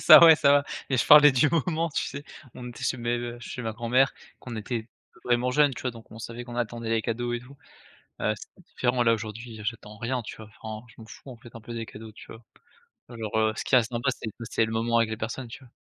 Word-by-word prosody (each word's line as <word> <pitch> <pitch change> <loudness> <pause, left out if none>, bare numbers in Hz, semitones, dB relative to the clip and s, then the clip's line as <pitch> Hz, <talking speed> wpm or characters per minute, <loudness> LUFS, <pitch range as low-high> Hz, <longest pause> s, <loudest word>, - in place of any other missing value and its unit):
ça, 155 0 +10
ouais, 160 -1 +9
ça 140 - +4
va 145 0 +4 0.3
mais 130 - +2
je - - +1
parlais 150 -1 +9
du 140 +4 +4
moment, 165 0 0
tu 150 - -2
sais? 140 +1 -6 0.3
On 125 -1 -8
était 120 - -8
chez 130 - 0
mes 120 0 -2
chez 125 0 -6
ma 110 - -3
grand-mère, 125 +4 +2 0.3
qu'on 120 - -8
était 110 +1 -4 0.4
vraiment 120 +1 +2
jeunes, 145 +1 +4
tu - - -7
vois? 125 - -1
Donc 115 -2 -14
on 110 - -11
savait 115 +2 -7
qu'on 120 0 -8
attendait 115 -1 -3
les 115 0 +2
cadeaux 120 +2 -2
et 120 - -2
tout. 135 +3 -15 0.7
Heu, 105 - +1
c'est 180 - -15
différent, 125 -5 -1
là, 115 -1 +4
aujourd'hui, 110 +1 -6
j'attends 105 -1 -5
rien, 125 +3 -2
tu 110 - -8
vois? 110 -1 -11
Enfin, 110 +1 -7
je 115 - -19
m'en 110 - -12
fous, 135 - -12
en 120 - -11
fait, 120 0 -15
un 115 - -9
peu 120 +2 -8
des 115 -1 -4
cadeaux, 110 +1 -10
tu 105 - -14
vois? 110 - -12 0.7
Alors, 115 -3 -5
heu, 110 0 +3
ce - - -3
qui 130 - +4
reste 115 -2 +3
sympa, 120 +3 0
c'est 115 - -6 0.2
c'est 115 - +2
le 110 - -4
moment 115 +1 +1
avec 115 -1 +2
les 110 - -3
personnes, 115 +4 -5
tu 120 - -10
vois? 125 - -17
120 Hz, 260 wpm, -27 LUFS, 115-130 Hz, 0.7 s, ça